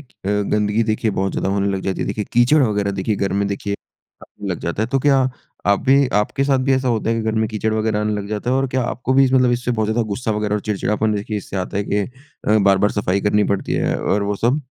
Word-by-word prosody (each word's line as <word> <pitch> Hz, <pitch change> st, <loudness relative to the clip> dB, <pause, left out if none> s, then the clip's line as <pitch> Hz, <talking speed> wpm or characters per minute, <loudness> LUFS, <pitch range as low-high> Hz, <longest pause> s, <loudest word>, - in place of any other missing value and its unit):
अ, 140 Hz, -, -18 dB, 0.4 s
गंदगी 105 Hz, +1 st, +1 dB
देखिए 110 Hz, 0 st, 0 dB
बहुत 95 Hz, -1 st, -1 dB
ज़्यादा -, -, -1 dB
होने 100 Hz, 0 st, 0 dB
लग -, -, -4 dB
जाती 95 Hz, -, -2 dB
है, -, -, -1 dB
देखिए 105 Hz, -, -2 dB
कीचड़ 125 Hz, +5 st, +4 dB
वगैरह 105 Hz, -4 st, +1 dB
देखिए 100 Hz, +2 st, -1 dB
घर 100 Hz, 0 st, -1 dB
में 100 Hz, +1 st, +1 dB
देखिए 100 Hz, 0 st, -3 dB, 0.8 s
लग 90 Hz, -, -2 dB
जाता 85 Hz, +5 st, -2 dB
है, -, -, 0 dB
तो 135 Hz, -, +1 dB
क्या 140 Hz, +1 st, +3 dB, 0.5 s
आप 100 Hz, 0 st, +3 dB
भी 135 Hz, +1 st, +5 dB
आपके 135 Hz, +6 st, -1 dB
साथ 135 Hz, -1 st, +2 dB
भी 130 Hz, +1 st, +1 dB
ऐसा 130 Hz, 0 st, 0 dB
होता 115 Hz, -1 st, 0 dB
है 115 Hz, -, +1 dB
कि 115 Hz, -, -1 dB
घर 110 Hz, 0 st, -1 dB
में 110 Hz, 0 st, +1 dB
कीचड़ 110 Hz, 0 st, -1 dB
वगैरह 110 Hz, -1 st, 0 dB
आने 105 Hz, 0 st, 0 dB
लग 100 Hz, -1 st, -4 dB
जाता 105 Hz, +3 st, -2 dB
है 130 Hz, -, +2 dB
और 135 Hz, -, +1 dB
क्या 130 Hz, 0 st, 0 dB
आपको 125 Hz, +2 st, -2 dB
भी 135 Hz, +1 st, +6 dB
इस 130 Hz, -, 0 dB
मतलब 125 Hz, -2 st, +4 dB
इससे 120 Hz, 0 st, -1 dB
बहुत 110 Hz, -3 st, 0 dB
ज़्यादा 115 Hz, +2 st, +1 dB
गुस्सा 110 Hz, +3 st, -2 dB
वगैरह 105 Hz, 0 st, -1 dB
और 105 Hz, -, -1 dB
चिड़चिड़ापन 105 Hz, +1 st, -1 dB
देखिए 105 Hz, +1 st, -3 dB
इससे 100 Hz, -1 st, -6 dB
आता 95 Hz, +1 st, -3 dB
है 100 Hz, -, 0 dB
कि 100 Hz, -, -1 dB
अ, 125 Hz, -1 st, -2 dB
बार-बार 100 Hz, 0 st, +3 dB
सफ़ाई 100 Hz, -1 st, 0 dB
करनी 105 Hz, +1 st, +2 dB
पड़ती 100 Hz, -, -4 dB
है -, -, 0 dB
और 100 Hz, -, +1 dB
वो 100 Hz, 0 st, -1 dB
सब? 125 Hz, +8 st, +1 dB
110 Hz, 265 wpm, -20 LUFS, 100-125 Hz, 0.8 s, भी